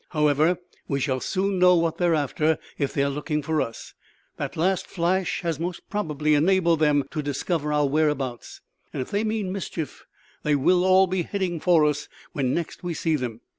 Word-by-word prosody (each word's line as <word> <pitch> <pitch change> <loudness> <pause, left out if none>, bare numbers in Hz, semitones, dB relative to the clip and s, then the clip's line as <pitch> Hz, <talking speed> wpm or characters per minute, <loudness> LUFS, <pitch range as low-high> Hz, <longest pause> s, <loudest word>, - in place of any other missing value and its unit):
However, 150 +2 +2 0.3
we 140 - -1
shall 130 -1 0
soon 190 +5 -1
know 180 0 +6
what 165 -1 0
they 175 - +3
are 165 - +3
after; 155 +1 +1 0.2
if 140 - 0
they 140 - 0
are 140 - +1
looking 150 +1 -2
for 155 +1 0
us, 115 - -6 0.4
that - - -4
last 185 +3 +1
flash 185 +1 0
has 165 -4 -2
most 175 +1 -5
probably 155 -7 0
enabled 170 +1 +3
them 150 -2 +3
to 155 - -2
discover 150 +2 -2
our 150 -1 +2
whereabouts; 140 -4 -1 0.3
and 130 - -2
if - - -14
they 205 +2 0
mean 215 -3 -1
mischief 170 -6 -5 0.3
they 150 -1 +2
will 180 +6 +3
all 190 +1 +5
be 185 0 -1
heading 180 -2 -2
for 165 -2 +4
us 150 0 -1 0.3
when 130 -3 0
next 170 +3 -3
we 175 -2 -3
see 160 0 0
them. 120 -5 -4
160 Hz, 195 wpm, -25 LUFS, 145-180 Hz, 0.4 s, know